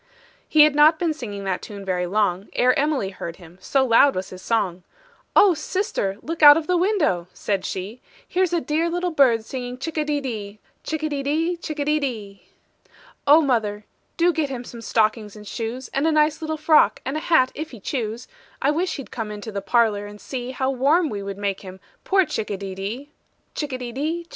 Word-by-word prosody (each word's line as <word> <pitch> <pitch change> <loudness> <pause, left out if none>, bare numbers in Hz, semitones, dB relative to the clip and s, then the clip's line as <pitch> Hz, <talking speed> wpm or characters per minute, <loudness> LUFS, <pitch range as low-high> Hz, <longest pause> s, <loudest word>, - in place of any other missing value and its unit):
He 305 -1 +7
had 305 -1 +4
not 300 +2 +6
been 330 -1 0
singing 205 -9 -7
that 190 -2 -2
tune 200 -2 -9
very 180 -1 -1
long, 195 -1 0
Ere 250 +1 +4
Emily 280 -8 0
heard 170 -3 -7
him, 175 0 -16
so 270 -1 +1
loud 260 +3 +5
was 185 +1 -4
his 185 0 -9
song: 195 -6 -1 0.5
"Oh, 395 -3 +7
sister, 335 - -2
look 330 +1 -5
out 290 0 +10
of 325 - -2
the 360 - +1
window," 340 - +1
said 200 -2 -2
she; 200 +6 -5 0.3
"Here's 365 -1 +1
a 345 - +2
dear 320 +2 0
little 355 +1 -1
bird 245 -7 +3
singing 250 -1 -5
chick 315 +4 -4
a - - +2
de 295 -1 -1
dee. 215 -6 -6 0.2
Chick 315 -1 -3
a 310 - 0
de 285 -2 -2
dee, 315 +5 0
etc. 285 - -3 0.9
"Oh, 300 +3 +8
mother, 215 -7 0 0.3
do 345 +1 +3
get 310 -3 -1
him 250 -2 -5
some 235 -1 -10
stockings 215 -1 0
and 210 -1 -11
shoes, 235 +5 -5
And 280 +4 0
a - - +3
nice 305 +1 +2
little 315 0 -3
frock, 310 0 +4
and 270 - -3
a - - 0
hat 310 -6 +3
if 310 +1 -6
he 235 - -11
choose; 230 +1 -4 0.3
I 280 - +2
wish 335 +3 -1
he'd 275 - -8
come 225 -3 -4
into 210 +1 -7
the 200 -1 -4
parlor 205 0 +1
and 205 0 -11
see 250 +1 -5
How 260 +1 -1
warm 290 +6 +2
we 205 -4 -4
would 195 0 -6
make 200 -1 -2
him, 190 -1 -10 0.3
poor 385 -1 +3
chick 295 -8 -4
a 200 - -2
de 195 -1 -6
dee." 220 +10 -6 0.4
Chick 295 -2 -4
a 255 - -2
de 245 -1 -6
dee, 310 +7 -2
etc. 340 - -18
255 Hz, 215 wpm, -23 LUFS, 205-310 Hz, 0.9 s, out